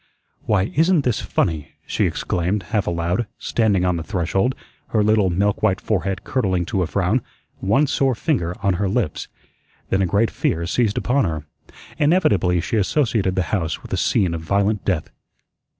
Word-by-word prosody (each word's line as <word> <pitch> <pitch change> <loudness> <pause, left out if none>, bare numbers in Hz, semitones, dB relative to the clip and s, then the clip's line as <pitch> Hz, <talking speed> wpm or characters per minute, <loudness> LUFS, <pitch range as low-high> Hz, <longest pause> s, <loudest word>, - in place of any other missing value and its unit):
"Why, 100 -1 +1
isn't 165 0 +3
this 125 -4 0
FUNNY," 80 -4 -1
she - - 0
exclaimed, 90 +3 -1
half 105 -3 +1
aloud, 85 +6 -1
standing 100 -6 +1
on 90 -1 +1
the 80 - -4
threshold, 95 +7 0 0.3
her 110 -2 +1
little 105 -2 +3
milk 100 +4 0
white 100 -3 +2
forehead 95 -2 -2
curdling 95 -9 0
to 95 +1 -1
a 90 - 0
frown, - - +1 0.4
one 110 +10 +3
sore 135 -2 +1
finger 100 - -1
on 100 -2 +3
her 100 - +1
lips. 100 -6 -1 0.6
Then 95 - +1
a 95 - +2
great 100 +6 +2
fear 85 +1 -1
seized 110 +3 0
upon 130 0 +2
her. 80 -3 -3 0.5
Inevitably 105 - +3
she 110 - -1
associated 110 -3 +1
the 95 - +1
house 85 -6 -1
with - - -8
a - - +3
scene 90 -4 +1
of 80 - -4
violent 100 +4 0
death. 90 -6 -1
100 Hz, 170 wpm, -21 LUFS, 90-110 Hz, 0.6 s, isn't